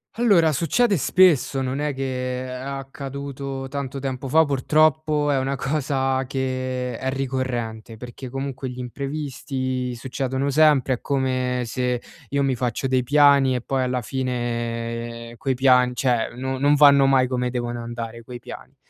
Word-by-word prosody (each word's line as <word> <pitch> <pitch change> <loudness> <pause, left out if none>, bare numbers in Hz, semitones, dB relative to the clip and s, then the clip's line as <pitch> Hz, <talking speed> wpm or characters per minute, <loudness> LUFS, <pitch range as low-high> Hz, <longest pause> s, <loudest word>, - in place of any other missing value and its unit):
Allora, 195 -9 +4
succede 195 - +2
spesso, 150 -4 +3
non 130 +2 -2
è 150 -1 -1
che 130 -1 -3
è - - -7
accaduto 135 0 -6
tanto 140 -1 -4
tempo 130 0 -4
fa 160 +4 +5
purtroppo, 150 +1 +2
è 135 - +2
una 135 +1 -1
cosa 135 -1 -1
che 130 -2 -3
è 130 - -2
ricorrente, 125 -4 -3
perché 125 +3 -9
comunque 135 0 -4
gli 125 0 -8
imprevisti 130 -1 -4
succedono 130 +2 -2
sempre, 140 -3 +4
è - - -11
come 130 -2 0
se 125 0 -1 0.3
io 140 0 0
mi 135 -2 +1
faccio 125 +2 -1
dei 130 -1 +1
piani 140 -1 +5
e 125 - -2
poi 130 +1 -1
alla 125 -1 -1
fine 115 -1 -3
quei 135 -1 -1
pian 125 -1 +4
cioè, 125 -3 +1
no 130 +1 -3
non 145 +2 +3
vanno 140 -1 +7
mai 135 -1 +4
come 125 -1 -1
devono 120 -1 -3
andare 115 0 -6
quei 120 +1 -9
piani. - - -11
130 Hz, 150 wpm, -23 LUFS, 125-140 Hz, 0.3 s, vanno